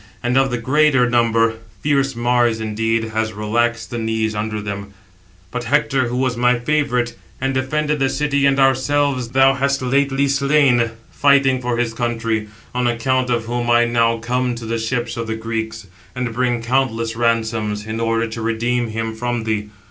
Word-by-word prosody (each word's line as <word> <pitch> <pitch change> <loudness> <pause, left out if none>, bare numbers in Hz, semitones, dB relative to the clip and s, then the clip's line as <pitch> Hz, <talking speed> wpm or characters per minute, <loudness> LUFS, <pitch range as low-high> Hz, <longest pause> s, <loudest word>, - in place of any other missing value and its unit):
And 120 +1 0
of 135 0 +3
the 120 - -1
greater 130 +1 +3
number 115 -2 +2 0.2
fierce 140 -2 +1
Mars 120 -1 +2
indeed 110 +1 -1
has 110 0 -1
relaxed 115 +3 -1
the 120 - -3
knees 110 -1 -1
under 105 0 -3
them; 100 -1 -6 0.6
but 125 -1 -4
Hector, 135 -1 +1
who 120 +1 -3
was 130 -1 0
my 125 +1 +3
favourite, 125 -2 0 0.3
793 130 - -3
and 135 - 0
defended 150 +3 -1
the 135 -1 +2
city 140 0 +1
and 140 0 +2
ourselves, 135 -1 +2
thou 135 +2 +4
hast 140 0 0
lately 140 +1 +1
slain, 140 -4 +3 0.2
fighting 135 -2 +3
for 120 -1 -1
his 120 -2 -1
country; 115 -2 -2 0.3
on 125 0 0
account 125 +2 0
of 120 -2 0
whom 120 +1 -2
I 120 0 +5
now 115 -1 +2
come 125 +2 -1
to 115 -1 -7
the 115 +1 -2
ships 120 +1 -2
of 115 -1 -3
the 110 - -2
Greeks, 110 -1 -4 0.3
and 125 -2 -3
bring 120 -1 0
countless 115 -2 0
ransoms, 110 -3 0
in 110 +1 -4
order 115 0 +1
to 115 +1 -6
redeem 120 +2 0
him 115 0 -3
from 120 +1 -2
thee. 105 -1 -2
120 Hz, 180 wpm, -19 LUFS, 115-130 Hz, 0.6 s, I